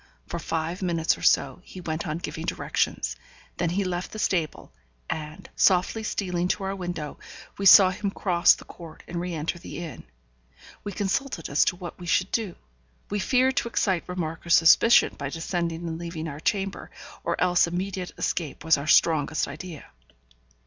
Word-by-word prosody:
For 170 - -5
five 165 +3 -3
minutes 170 -3 +1
or - - -13
so - - +2
he 185 - -11
went 165 -1 -4
on 155 0 -2
giving 175 - -5
directions. - - -1 0.4
Then 170 - 0
he 195 +4 0
left 180 -1 -3
the - - -7
stable, 175 -7 -1 0.3
and, 155 +3 -5
softly 185 +4 +3
stealing 180 -4 -1
to 195 - -1
our 195 +1 -2
window, 175 -5 -5 0.4
we 195 - +3
saw 190 0 +9
him 200 +2 -2
cross 180 -3 +4
the - - -14
court 165 -2 -12
and 170 0 -4
re 175 -1 -3
enter 160 +2 -3
the - - -8
inn. 170 -3 -7 0.8
We 205 - -4
consulted 200 - -2
as 140 - +4
to - - +1
what 180 0 -8
we 175 - -8
should 185 +2 +1
do. 215 -6 -1 0.6
We 205 - 0
feared 260 +5 +2
to - - +1
excite 190 -6 0
remark 165 -3 -4
or 170 - -10
suspicion 170 +8 +6
by 140 -1 -3
descending 170 +1 -3
and 165 0 -4
leaving 165 -2 -5
our 145 -1 -6
chamber, 195 +3 -2 0.3
or - - -1
else 180 -1 +4
immediate 180 +1 -3
escape 155 -5 -2
was 160 -3 +4
our 140 - -6
strongest 155 -1 +3
idea. 155 +2 -8
175 Hz, 175 wpm, -26 LUFS, 165-190 Hz, 0.8 s, saw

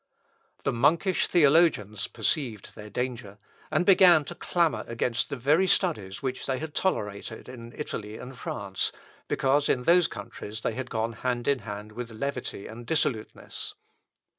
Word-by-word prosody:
The - - +1
monkish 165 +10 +3
theologians 145 - +4
perceived 125 - -2
their 105 0 -10
danger, 115 -3 -4 0.3
and 175 - +1
began 180 -5 +7
to - - -6
clamour 170 -3 +1
against 115 +1 -1
the 140 - -2
very 150 +9 +3
studies 140 - 0
which 130 -1 -3
they 130 -1 0
had 155 +2 -6
tolerated 105 - -2
in 120 -2 -9
Italy 110 -7 -5
and 130 +1 -9
France, 100 -5 -2 0.4
because 140 +2 +2
in 125 - +2
those 175 +3 +5
countries 105 0 -7
they 115 - -1
had 130 +1 -5
gone 115 0 -1
hand 120 0 -2
in 140 -2 +3
hand 105 -1 -7
with 120 +2 -6
levity 120 -2 -4
and 115 +2 -9
dissoluteness. 125 -8 -2
125 Hz, 150 wpm, -27 LUFS, 110-150 Hz, 0.4 s, began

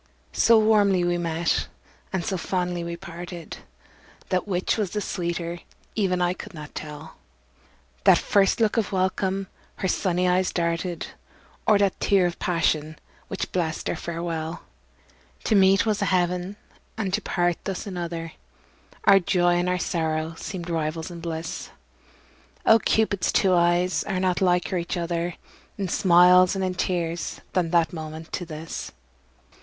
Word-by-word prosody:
So 230 -1 +5
warmly 205 -4 +4
we 175 0 +1
met 165 -1 0 0.4
and 190 -3 -2
so 200 - -1
fondly 180 -1 -2
we 170 0 -5
parted, 175 0 -8 0.7
That 185 +1 0
which 185 -2 0
was 210 -4 -1
the 210 - -2
sweeter 170 -3 -3 0.3
even 185 -4 +1
I 175 0 +2
could 185 - -10
not 150 -1 -9
tell, 150 -1 -8 0.9
That - - +8
first 200 +1 +2
look 220 0 +2
of 220 -3 0
welcome 190 +1 0 0.3
her 190 - -2
sunny 180 -1 +1
eyes 180 +1 +2
darted, 170 0 -1 0.6
Or 210 - +6
that 200 -2 +1
tear 195 -3 +3
of 175 -1 -2
passion, 155 -3 0 0.3
which 195 - -4
blest 170 -3 -1
our - - -2
farewell. 165 0 -4 0.8
To - - +1
meet 195 0 +5
was 210 -2 0
a - - +2
heaven 180 +1 0 0.4
and 200 -4 -2
to - - +1
part 175 -1 0
thus 195 +2 -3
another, 170 -3 -5 0.7
Our 195 0 +7
joy 175 -1 +2
and 180 +1 0
our 180 - +1
sorrow 160 -2 -1
seemed 175 0 -6
rivals 160 +1 -2
in 170 - -8
bliss; 165 -1 -5 1.0
Oh! 225 0 +7
Cupid's 215 -3 +1
two 190 -1 +3
eyes 175 +1 +2
are 190 -3 -1
not 185 0 +1
liker 180 0 +2
each 170 +1 -3
other 170 0 -2 0.4
In 195 -2 -2
smiles 180 +1 +6
and 190 - -1
in 185 - -1
tears 175 -2 -2
than 180 -3 +1
that 170 -1 +2
moment 160 0 -7
to 175 - -3
this. 160 0 -6
175 Hz, 150 wpm, -25 LUFS, 170-190 Hz, 1.0 s, That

